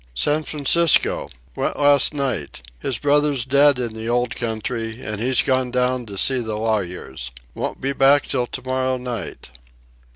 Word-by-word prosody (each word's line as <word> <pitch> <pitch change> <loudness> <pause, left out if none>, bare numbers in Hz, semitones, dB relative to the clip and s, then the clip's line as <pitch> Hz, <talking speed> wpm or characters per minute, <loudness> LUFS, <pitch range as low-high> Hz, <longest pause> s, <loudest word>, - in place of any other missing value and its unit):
"San 145 - +2
Francisco. 155 +2 +2 0.3
Went - - -2
last 145 -1 +4
night. 130 - -3 0.2
His 125 - -2
brother's 145 -2 +2
dead 140 +1 +4
in 120 -3 -3
the 110 +1 -5
old 120 0 0
country, 115 0 -3
and 105 -1 -4
he's 130 +1 +2
gone 130 -2 +1
down 125 -1 0
to 100 -1 -7
see 130 +5 +2
the 110 -3 -3
lawyers. 90 - -3 0.2
Won't - - -4
be 135 +1 0
back 140 +1 +4
till 125 -3 -1
tomorrow 130 +1 -2
night." 125 - -6
125 Hz, 155 wpm, -21 LUFS, 115-140 Hz, 0.3 s, last